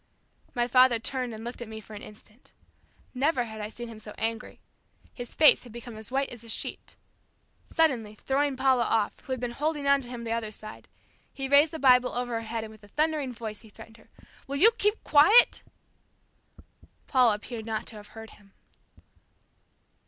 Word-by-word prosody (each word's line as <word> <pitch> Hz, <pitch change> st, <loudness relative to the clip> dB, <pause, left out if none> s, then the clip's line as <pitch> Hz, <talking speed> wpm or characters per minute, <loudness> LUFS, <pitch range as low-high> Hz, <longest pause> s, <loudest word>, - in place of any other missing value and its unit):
My 240 Hz, 0 st, +1 dB
father 255 Hz, -1 st, +5 dB
turned 250 Hz, +2 st, -3 dB
and 220 Hz, 0 st, -8 dB
looked 240 Hz, +1 st, -7 dB
at 240 Hz, -, -6 dB
me 220 Hz, 0 st, -8 dB
for 220 Hz, 0 st, -14 dB
an 205 Hz, -, -8 dB
instant. 215 Hz, +3 st, -15 dB, 0.6 s
Never 265 Hz, 0 st, +1 dB
had 220 Hz, -2 st, -8 dB
I 210 Hz, -, -5 dB
seen 240 Hz, +2 st, -8 dB
him 225 Hz, -2 st, -10 dB
so 210 Hz, -1 st, -10 dB
angry. 225 Hz, 0 st, -4 dB, 0.5 s
His 245 Hz, -2 st, -9 dB
face 310 Hz, -, +6 dB
had 245 Hz, -, -13 dB
become 235 Hz, 0 st, -9 dB
as 220 Hz, 0 st, -8 dB
white 270 Hz, +1 st, -1 dB
as 235 Hz, -2 st, -10 dB
a 230 Hz, -, -13 dB
sheet. -, -, -2 dB, 0.8 s
Suddenly 245 Hz, -10 st, +1 dB
throwing 275 Hz, +4 st, -1 dB
Paula 260 Hz, -2 st, +3 dB
off, 220 Hz, -2 st, 0 dB
who -, -, -11 dB
had 260 Hz, -, -1 dB
been 245 Hz, 0 st, -3 dB
holding 295 Hz, +3 st, -2 dB
on 280 Hz, 0 st, +4 dB
to 245 Hz, -, -8 dB
him 245 Hz, -1 st, -7 dB
on -, -, -8 dB
the 230 Hz, -, -4 dB
other 230 Hz, -1 st, -2 dB
side, 215 Hz, 0 st, -10 dB, 0.4 s
he 270 Hz, -1 st, -4 dB
raised 285 Hz, +3 st, +5 dB
the 320 Hz, -, -5 dB
Bible 250 Hz, -3 st, +4 dB
over 245 Hz, 0 st, -3 dB
her 230 Hz, -, -2 dB
head 225 Hz, 0 st, -3 dB
and 220 Hz, -, -9 dB
with 215 Hz, -1 st, -17 dB
a -, -, -14 dB
thundering 300 Hz, +2 st, -1 dB
voice, 220 Hz, -3 st, -7 dB
he 220 Hz, -, -16 dB
threatened 225 Hz, +2 st, -14 dB
her. -, -, -22 dB, 0.4 s
"Will 280 Hz, +1 st, -3 dB
you 435 Hz, +10 st, +8 dB
keep 420 Hz, +2 st, 0 dB
quiet?" 320 Hz, +11 st, +6 dB, 1.4 s
Paula 250 Hz, -5 st, +3 dB
appeared 220 Hz, +1 st, -8 dB
not 220 Hz, 0 st, -3 dB
to 225 Hz, -, -9 dB
have 205 Hz, 0 st, -12 dB
heard 225 Hz, -1 st, -9 dB
him. 200 Hz, -2 st, -21 dB
240 Hz, 200 wpm, -27 LUFS, 220-270 Hz, 1.4 s, you